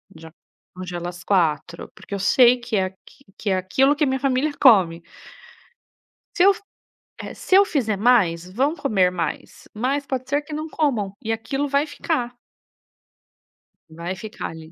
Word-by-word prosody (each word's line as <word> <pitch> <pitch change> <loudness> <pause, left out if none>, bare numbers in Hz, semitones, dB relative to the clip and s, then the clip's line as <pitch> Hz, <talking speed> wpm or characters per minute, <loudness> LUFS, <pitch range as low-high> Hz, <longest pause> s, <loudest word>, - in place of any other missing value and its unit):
Já 160 0 -12 0.4
congelo 180 -1 -6
as 175 0 -8
4. 170 -4 -1
Porque - - -11
eu 200 - -2
sei 245 +6 +5
que 240 -2 -5
é 190 -2 +2
aqu 190 0 -8 0.4
que 210 - -3
é 190 - +2
aquilo 265 +11 +2
que 300 - 0
a - - +3
minha 265 0 -1
família 275 +2 0
come. 180 -10 +5 1.3
Se 355 - +3
eu 395 +1 +7
f - - -13 0.6
eh, - - -7
se 375 - 0
eu 395 +1 +7
fizer 225 - -1
mais, 185 -7 +2
vão 275 - +1
comer 210 - +1
mais. 170 -4 -5
Mas, 270 +6 -1
pode 260 -1 -4
ser 290 +1 +1
que 300 +1 -10
não 310 +1 -4
comam 240 -12 -1
e 225 - -3
aquilo 270 +6 -3
vai 280 +2 +1
ficar. 290 -4 -3 1.6
Vai 170 +3 -6
ficar 215 +3 -7
ali. 160 0 -12
225 Hz, 170 wpm, -22 LUFS, 185-280 Hz, 1.6 s, eu